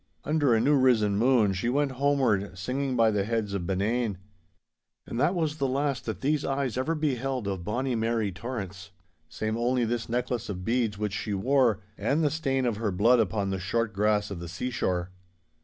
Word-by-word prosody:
Under 145 -5 +2
a - - +3
new 140 +6 +3
risen 120 -7 +3
moon 115 -2 +3
she 95 +6 -1
went 140 +2 +1
homeward, 125 -8 +1
singing 130 +7 -2
by 115 -2 +4
the 105 -2 +1
heads 110 -1 -2
of 90 -3 -3
Benane. 105 +2 0 0.9
And 115 - -5
that 175 - +2
was 155 -3 -1
the 140 -2 0
last 135 -1 -1
that 110 -5 -4
these 150 +1 +1
eyes 135 -3 -1
ever 130 +6 0
beheld 135 -6 -1
of 95 -3 -3
bonny 125 +7 -1
Mary 115 -2 0
Torrance—save 95 -2 -6
only 120 +1 +1
this 115 0 -2
necklace 120 -1 -2
of 90 -2 -5
beads 115 -3 0
which 105 -1 -2
she 105 0 -2
wore, 120 0 +2 0.2
and 140 +10 +1
the 150 - +2
stain 135 -5 0
of 115 -4 0
her 110 -1 -1
blood 115 +6 +4
upon 100 -2 0
the 95 - -2
short 105 +4 -1
grass 105 +1 +1
of 95 - -5
the 85 -1 -7
seashore. 95 -3 -2
115 Hz, 190 wpm, -27 LUFS, 100-130 Hz, 0.9 s, by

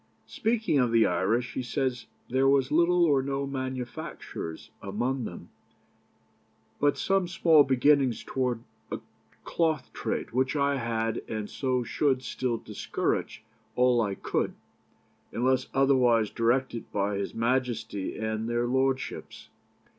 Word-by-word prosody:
Speaking 220 -9 0
of 125 -2 +2
the 115 -1 +5
Irish 110 +8 0
he - - -2
says, 125 0 -2 0.2
'There 130 +2 +2
was 135 -1 +3
little 170 +2 +4
or 140 -4 +3
no 135 +1 -2
manufactures 130 -8 -5
amongst 120 +6 -2
them, - - -8 1.3
but 145 0 +2
some 195 -2 +1
small 165 -3 +5
beginnings 135 -2 +3
towards 125 -3 -1 0.3
a - - -2 0.4
cloth 160 -6 -1
trade, - - -3
which 130 +4 +1
I 140 -1 +2
had 115 -2 -1
and 110 -2 -3
so 130 0 -1
should 130 +1 +1
still 125 -3 -2
discourage 110 - -3 0.3
all 125 -1 +4
I 100 -3 -1
could, - - -2 0.8
unless 130 +2 +1
otherwise 125 -5 +3
directed 120 0 0
by 100 0 0
His 100 - -4
Majesty 115 -4 -1
and 110 +1 -2
their 120 0 +1
Lordships. 130 +1 -2
130 Hz, 125 wpm, -28 LUFS, 115-135 Hz, 1.3 s, the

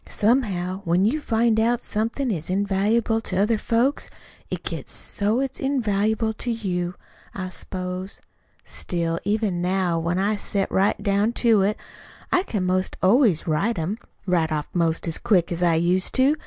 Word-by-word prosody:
Somehow, 200 -5 0
when 175 +2 +2
you 290 +8 +1
find 225 -3 +2
out 235 +2 +2
somethin' 230 +4 -1
is 165 -4 -4
invaluable 205 +4 +1
to 185 -4 -4
other 210 +3 +2
folks, 240 +7 0 0.4
it - - -4
gets - - -5
so 210 +4 -1
it's 270 -1 -3
invaluable 220 -4 0
to 240 - -5
you, 180 -6 -2 0.4
I 185 -1 -4
s'pose. 185 +1 -6 0.5
Still, 170 -1 -2
even 205 -4 0
now, 180 -2 +1
when 170 +2 -1
I 205 +2 +1
set 200 -1 -2
right 195 +2 +2
down 205 +3 +2
to 225 -4 +5
it, 205 +2 +1 0.5
I 360 - +4
can 210 - -2
'most 185 +1 0
always 205 - +4
write 195 +9 0
'em 170 +5 -1 0.3
right 175 -4 +1
off 150 -2 -2
'most 165 -1 0
as 165 - -1
quick 195 -8 +2
as 170 0 -2
I 170 -2 +3
used 175 +3 +2
to. 270 +3 +4
200 Hz, 165 wpm, -23 LUFS, 180-225 Hz, 0.5 s, to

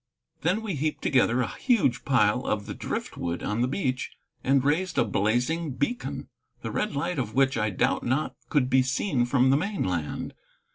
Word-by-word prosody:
Then 185 +7 +1
we 210 -4 -2
heaped 155 +1 -2
together 125 -2 +3
a 120 - 0
huge 225 - +2
pile 125 -2 +3
of 105 -1 -1
the - - -5
driftwood 85 0 -4
on 105 +3 -1
the 125 - +2
beach 130 -3 -1 0.3
and 135 0 +3
raised 160 +5 0
a - - +4
blazing 125 +10 0
beacon, 240 - -3 0.4
the - - -3
red 210 -8 -1
light 170 +2 -1
of 110 -4 -3
which 135 0 +3
I 110 -1 +1
doubt 95 - 0
not 130 +5 0 0.2
could 140 -4 +2
be 130 0 +4
seen 130 +1 0
from 130 +1 +3
the 135 - +5
mainland. 95 - -2
130 Hz, 180 wpm, -27 LUFS, 120-160 Hz, 0.4 s, the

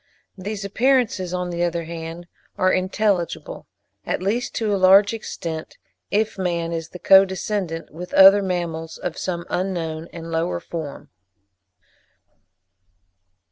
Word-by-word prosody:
These 200 +1 -5
appearances, 225 -4 +1
on 180 -1 -2
the 170 0 -3
other 170 -1 0
hand, 165 +1 -7 0.3
are 185 0 +3
intelligible, 190 - -1 0.4
at - - -2
least 210 +7 -2
to 215 -2 0
a - - +3
large 195 +3 +6
extent, 165 -7 -6 0.3
if 215 -1 0
man 170 -2 -1
is 165 -1 -4
the - - -9
co 190 +2 +7
descendant 190 -3 -3
with 180 +3 -8
other 195 +1 +9
mammals 170 -4 -3
of 175 - -4
some 175 -2 -3
unknown 170 -4 -2
and 165 -1 -8
lower 160 - -1
form. 155 - -7
180 Hz, 130 wpm, -22 LUFS, 165-195 Hz, 0.4 s, other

